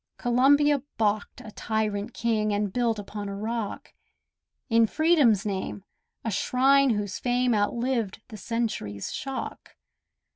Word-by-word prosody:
Columbia 280 +3 +4 0.2
baulked 215 +2 -1
a 220 -4 -10
tyrant 215 0 -2
king, 220 -2 0
And 205 -1 -1
built 235 -3 +1
upon 205 0 -6
a 200 - -5
rock, 220 +1 -4 0.7
In 230 -2 +4
Freedom's 290 - +3
name, 195 -1 -3 0.4
a 225 - -1
shrine 270 +6 +3
whose 205 -3 -1
fame 245 0 +1
Outlived 225 0 0
the 220 - -8
century's 215 - -3
shock. 270 -1 -6
225 Hz, 120 wpm, -26 LUFS, 205-250 Hz, 0.7 s, Columbia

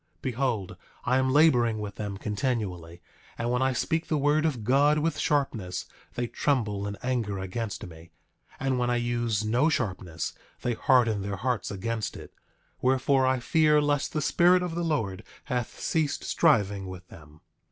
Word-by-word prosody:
9:4 - - -43
Behold, 125 -6 -2 0.3
I 130 +1 +3
am 130 0 +1
laboring 125 -7 +4
with 105 -1 -5
them 100 -2 -4
continually; 100 -7 -3 0.3
and 120 +1 -1
when 125 +1 +1
I 130 0 +3
speak 160 +6 -1
the 155 - +1
word 150 +2 +2
of 125 -8 -3
God 140 +6 +4
with 160 +1 0
sharpness 110 -11 -1 0.3
they 120 - -1
tremble 110 -6 -1
and 100 0 -5
anger 120 -6 -1
against 100 +3 -4
me; 85 -1 -12 0.5
and 135 -1 0
when 125 0 +1
I 120 - +2
use 120 -3 0
no 125 +8 +3
sharpness 95 - -2 0.3
they 120 - +1
harden 115 -4 +3
their 100 +1 -3
hearts 125 +2 -1
against 110 +2 -3
it; - - -11 0.5
wherefore, 130 +1 +3
I 130 -1 +2
fear 150 +4 +3
lest 145 -1 0
the 155 - -1
Spirit 180 +3 +4
of 175 -2 -3
the 170 +1 -2
Lord 110 - -1 0.2
hath 125 -2 -3
ceased 155 -3 0
striving 100 - +2
with 90 -1 -9
them. 75 0 -15
120 Hz, 170 wpm, -27 LUFS, 100-140 Hz, 0.5 s, laboring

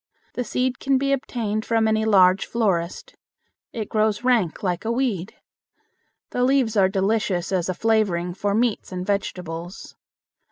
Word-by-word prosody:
The 250 - -2
seed 250 +2 -1
can 270 -1 +2
be 275 +1 0
obtained 220 -5 -2
from 225 -1 +1
any 220 0 +1
large 190 -3 +4
florist. 185 -7 -1 0.6
It 220 -3 -4
grows 215 +1 0
rank 230 -11 +1
like 180 -2 -1
a 225 - -1
weed. 230 -7 -2 1.0
The 250 - 0
leaves 255 -4 +2
are 190 -2 +4
delicious 195 -2 0
as 185 -2 0
a 185 - -1
flavoring 195 -6 +1
for 200 +2 -1
meats 230 -3 0
and 180 0 -4
vegetables. 180 -2 -4
215 Hz, 150 wpm, -23 LUFS, 185-230 Hz, 1.0 s, large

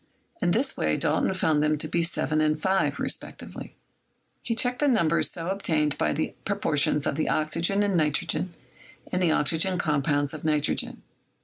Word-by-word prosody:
In - - +2
this 255 +9 +1
way - - 0
Dalton - - +1
found 160 -4 +1
them 150 0 +1
to - - -2
be 170 - 0
7 155 -2 0
and 155 0 +1
5, 190 +3 0
respectively. - - -6 0.7
He 230 - -2
checked 245 +1 +1
the 295 - +2
numbers 170 - +3
so 170 +1 -4
obtained 155 -7 0
by 75 - +1
the - - -2
proportions 145 0 +1
of 140 - -1
the 155 - 0
oxygen 165 +6 +1
and 200 -2 0
nitrogen 155 +3 +1 0.6
in 180 - 0
the 180 -2 +2
oxygen 165 +5 +2
compounds 145 -3 0
of 155 - -8
nitrogen. 150 -2 0
160 Hz, 170 wpm, -26 LUFS, 150-185 Hz, 0.7 s, numbers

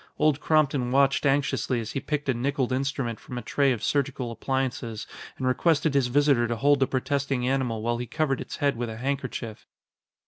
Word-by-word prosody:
Old 150 -1 +3
Compton 145 -5 +2
watched 135 +2 +3
anxiously 135 -2 +1
as 110 -1 -5
he - - -2
picked 150 +1 -3
a 130 - +3
nickeled 130 +1 -1
instrument 130 -3 -1
from 125 - -8
a 120 - -4
tray 140 +4 +2
of 115 -4 -2
surgical 135 -4 -1
appliances 120 -2 -2 0.3
and 130 - -3
requested 150 +3 +2
his 135 -3 +3
visitor 135 -2 +3
to 120 - -1
hold 140 +4 +3
the 135 - +3
protesting 135 -1 -1
animal 125 -5 0
while 120 +1 0
he 125 - -4
covered 150 -3 0
its - - -6
head 140 -2 +1
with 120 0 -3
a 110 - -6
handkerchief. 125 -3 -4
135 Hz, 195 wpm, -26 LUFS, 120-140 Hz, 0.3 s, Old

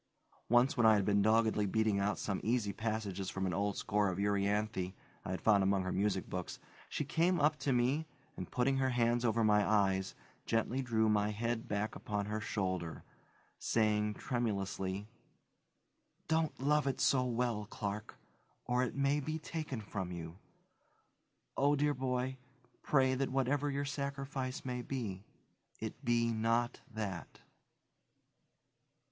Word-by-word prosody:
Once 120 +3 +4
when 120 - +3
I 110 - +7
had 100 -2 +1
been 100 -1 +3
doggedly 110 -1 +3
beating 110 0 +2
out 100 +1 0
some 100 -2 -2
easy 110 -3 +1
passages 105 -3 -2
from 95 0 -2
an 90 - -1
old 100 +3 0
score 105 -1 +1
of 90 - -3
Euryanthe 100 -1 0 0.3
I - - -6
had 95 - -3
found 105 -3 +5
among 95 0 +2
her 95 - -2
music 100 -1 0
books, 90 -1 -4 0.3
she 150 - -2
came 170 +5 +2
up 150 +1 +4
to 140 - 0
me 130 +6 +1 0.3
and, - - -6
putting 135 +2 +1
her 130 0 +2
hands 120 -1 +2
over 115 -1 +2
my 105 -1 +4
eyes, 95 -2 +2 0.3
gently 115 +3 +1
drew 115 -3 +1
my 105 -1 +2
head 115 +2 -2
back 105 +1 -2
upon 105 -1 -3
her 105 +1 -3
shoulder, 95 -6 -2 0.6
saying 105 -1 +1
tremulously, 100 -4 -2 1.2
"Don't 160 -1 +1
love 145 +2 +2
it 135 - -1
so 130 -2 +4
well, 120 -4 -1
Clark, 105 -2 -4 0.5
or 125 +1 +1
it 125 - -3
may 140 +1 +2
be 155 +2 -3
taken 155 -5 -4
from 95 -3 -4
you. 85 +1 -7 1.2
Oh, 145 +1 +3
dear 145 +1 +2
boy, 130 0 -1 0.4
pray 130 -2 +3
that 135 +1 0
whatever 135 +2 +1
your 140 0 -1
sacrifice 140 -1 -4
may 125 -1 -2
be, 110 -7 -4 0.5
it - - -6
be 115 0 +2
not 115 +2 0
that." 105 -5 -5
110 Hz, 150 wpm, -34 LUFS, 100-130 Hz, 1.2 s, I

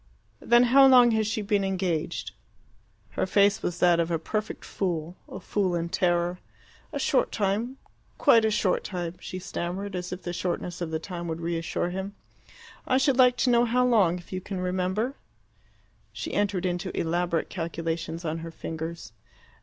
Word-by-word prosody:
"Then 240 +1 +5
how 275 0 +9
long 250 -2 +7
has 220 -1 +1
she 215 0 -2
been 200 0 +1
engaged?" 180 - -2 0.8
Her - - -1
face 200 +1 +3
was 175 - -2
that 175 -1 +4
of 165 0 +1
a 170 - +1
perfect 215 +7 -4
fool 175 -3 -3
a - - -7
fool 185 -1 -1
in 170 0 -2
terror. 175 -1 +1 0.5
"A - - -3
short - - +1
time 215 +6 -1 0.4
quite 230 -1 +5
a 220 - +3
short 210 -3 +1
time," 175 -3 -4
she 185 - -6
stammered, 185 +2 -4
as 180 0 -4
if 185 +1 -6
the 175 - -4
shortness 175 0 -3
of 170 - -2
the 160 - -1
time 170 +1 -6
would 160 0 -3
reassure 170 +1 -2
him. 190 +2 -5 0.7
"I 260 - +3
should 270 -1 +2
like 250 -1 +6
to 250 - +3
know 240 0 +4
how 250 +2 +2
long, 200 -8 +3
if 175 +1 -12
you 185 - -3
can 190 0 -5
remember." 185 +8 -1 0.9
She - - -6
entered 200 -3 0
into 175 -1 -2
elaborate 170 0 0
calculations 165 0 -4
on 160 +1 -2
her 165 0 -7
fingers. 165 -2 -6
180 Hz, 175 wpm, -27 LUFS, 170-210 Hz, 0.9 s, how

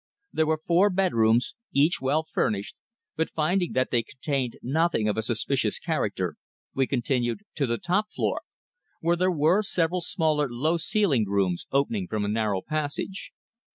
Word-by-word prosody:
There 160 -1 +2
were 160 0 +2
four 175 +5 +3
bedrooms, 150 - +2 0.2
each 145 +3 +3
well 145 +4 +1
furnished, 100 -1 -1 0.4
but 160 - 0
finding 175 +3 0
that 130 0 +1
they 120 - +3
contained 130 0 -3
nothing 155 -4 +1
of 105 - +1
a 110 - 0
suspicious 110 - 0
character - - -2 0.4
we 135 -1 +1
continued 125 +3 0 0.2
to 140 -3 +1
the 115 0 0
top 200 - 0
floor, - - -1 0.6
where 170 +1 +2
there 185 +2 +2
were 165 +5 +3
several 180 -3 0
smaller 155 -4 0
low 150 +8 0
ceilinged 165 - +1
rooms 95 -3 0
opening 180 - 0
from 105 -2 -1
a - - -1
narrow 105 -3 0
passage. 155 +5 -3
150 Hz, 155 wpm, -26 LUFS, 120-175 Hz, 0.6 s, four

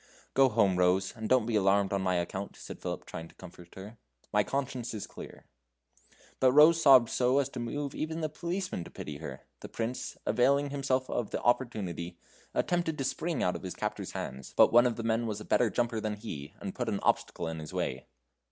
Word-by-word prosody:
"Go 135 0 +5
home, 100 -5 +3
Rose, 90 +1 +2
and 110 -2 -5
don't 130 -3 +4
be 115 -1 -1
alarmed 100 -1 +3
on 100 - +1
my 90 -1 +1
account," 95 +3 -3
said - - -10
Philip, - - -4
trying 80 - -7
to - - -20
comfort 90 -1 -13
her; 105 +4 -10 0.3
"my 105 0 +4
conscience 125 -3 -3
is 105 - -4
clear." - - -11 0.9
But 130 -1 +4
Rose 160 +3 +7
sobbed 130 -6 +7
so 125 +1 +2
as 140 -1 +2
to 130 - -7
move 140 +4 -3
even 160 +1 -3
the 155 - 0
policemen 170 - -3
to - - -10
pity 75 -1 -7
her. 70 -4 -7 0.2
The - - -9
Prince, 115 +2 -4
availing 140 +3 +2
himself 130 -2 0
of 115 - -2
the - - -3
opportunity, 95 -9 -1 0.4
attempted 170 -3 0
to 135 - -2
spring 160 +3 -1
out 90 - +1
of - - -5
his 95 -2 -6
captors' - - -4
hands, 65 +1 -6
but - - +6
one 120 +1 +7
of 120 - -1
the 115 - -5
men 115 +1 +1
was 105 -1 -3
a 105 - -9
better 120 - +3
jumper 115 +2 0
than 105 -1 -2
he, 80 -6 -8
and 95 - -5
put 125 -2 -2
an 100 -2 -1
obstacle 85 - 0
in 80 0 -4
his 75 -1 -8
way. - - -3
115 Hz, 215 wpm, -30 LUFS, 95-130 Hz, 0.9 s, Rose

